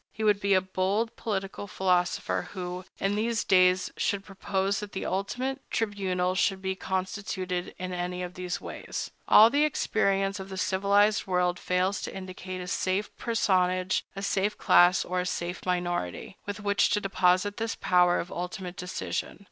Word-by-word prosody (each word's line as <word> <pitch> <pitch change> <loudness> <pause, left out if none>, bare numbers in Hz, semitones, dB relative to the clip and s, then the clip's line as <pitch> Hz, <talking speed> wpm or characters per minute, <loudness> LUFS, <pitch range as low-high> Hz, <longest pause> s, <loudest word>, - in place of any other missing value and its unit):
He 220 - -5
would 210 -2 +4
be 200 -1 +3
a 185 - +4
bold 190 +4 -1
political 200 -2 -4
philosopher 180 -2 0
who, 180 -1 -5
in 195 +1 0
these 225 +2 0
days, 185 0 +4
should 200 -1 -1
propose 195 0 -1
that 210 -1 -7
the 190 - -4
ultimate 255 +8 -2
tribunal 190 -4 0
should 190 +1 +1
be 190 0 -2
constituted 190 -1 -3
in 185 0 -4
any 180 0 -3
of 180 0 -6
these 180 -1 -4
ways. - - -6 0.2
All 220 +2 +8
the 290 +1 +3
experience 195 -8 +1
of 190 0 -7
the 190 - -6
civilized 200 +3 +2
world 180 -1 +1
fails 185 +2 0
to - - -6
indicate 185 -1 -6
a 180 - -6
safe 190 +3 -1
personage, 185 -5 +1
a 195 - -5
safe 200 +1 0
class, 175 0 +5
or 180 +1 -1
a - - 0
safe 175 0 -3
minority, 175 - -2
with 205 +1 -4
which 200 -1 +2
to 210 - +2
deposit 195 0 +2
this 225 0 -2
power 180 -1 +3
of 175 - -5
ultimate 180 0 -5
decision. 180 +2 -4
190 Hz, 165 wpm, -28 LUFS, 180-200 Hz, 0.2 s, All